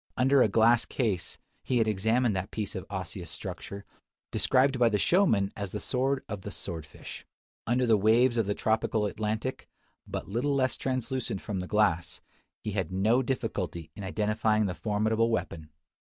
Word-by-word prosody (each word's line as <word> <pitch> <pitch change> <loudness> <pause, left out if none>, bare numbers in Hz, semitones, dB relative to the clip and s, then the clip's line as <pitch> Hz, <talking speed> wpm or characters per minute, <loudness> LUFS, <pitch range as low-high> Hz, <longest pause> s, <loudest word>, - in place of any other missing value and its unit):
Under 135 +1 +4
a - - +6
glass 115 +3 +4
case 105 -9 -2 0.2
he 125 - 0
had 115 -2 +3
examined 110 +2 +2
that 95 +1 -3
piece 105 -2 -4
of 95 - -6
osseous 95 -3 -5
structure, 100 0 -6 0.5
described 130 0 +3
by 120 -1 +5
the 105 - +1
showman 110 - +3
as 100 -2 -4
the 105 - -4
sword 130 +5 0
of 100 -2 -5
the 105 - -6
sword 85 -6 -6
fish. - - -10 0.4
Under 125 +2 +2
the 115 -2 +4
waves 120 +4 +4
of 115 -4 +1
the 105 - 0
tropical 110 -1 +1
Atlantic, 110 +4 -3 0.4
but - - -5
little 125 +8 0
less 130 -1 +1
translucent 130 -5 -3
than 100 -4 -2
the 90 - -4
glass, 90 -5 +1 0.4
he 105 - -2
had 95 -4 -2
no 110 +7 +3
difficulty 100 - -3
in 100 - -7
identifying 105 +2 +1
the 95 - -1
formidable 110 +3 +1
weapon! 85 -8 -3
110 Hz, 170 wpm, -29 LUFS, 100-120 Hz, 0.5 s, a